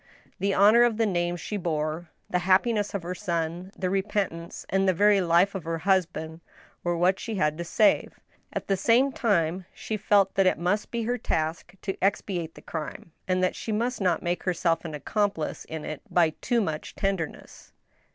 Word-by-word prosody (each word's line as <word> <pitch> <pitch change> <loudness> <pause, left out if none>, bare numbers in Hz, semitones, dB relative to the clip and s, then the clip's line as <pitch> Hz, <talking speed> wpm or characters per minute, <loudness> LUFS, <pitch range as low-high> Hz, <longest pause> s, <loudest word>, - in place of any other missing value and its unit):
The 195 0 +1
honor 210 +4 +6
of 240 -2 +3
the 225 - +2
name 175 -3 0
she 210 +4 -4
bore, 160 -1 -2 0.2
the 180 - 0
happiness 200 +4 +2
of 195 - -3
her 175 +1 -3
son, 175 -1 -3
the; 185 - -1
repentance 190 -3 -2
and 195 0 +2
the 185 - +2
very 205 +1 +5
life 175 +3 +3
of 190 -4 -5
her 165 +1 -2
husband, 170 -3 0 0.4
were 175 -1 0
what 185 +3 +2
she 225 - -4
had 150 -5 +1
to - - -1
save; 205 +5 +3
and - - -21 0.5
at - - -39
the 195 - +2
same 240 +8 +3
time 185 -7 0
she 220 - -4
felt 200 -1 +3
that 195 -1 +3
it - - +3
must 180 +6 0
be 235 -1 -2
her 245 +2 -1
task 160 -2 -2
to 195 - -1
expi< 195 -1 0
ate 165 -1 -7
the - - -13
crime, 160 +1 -6 0.2
and 185 0 +1
that 185 - +1
she 225 - -5
must 235 +3 -1
not 180 -3 +1
make 175 +1 -1
herself 175 -2 0
an 155 -2 -5
accomplice 200 +2 -2
in 160 -1 -6
it 155 -2 -5
by 170 -3 +3
too 235 +8 0
much 160 -6 -4
tenderness. 195 -5 -4
185 Hz, 200 wpm, -26 LUFS, 170-205 Hz, 0.5 s, honor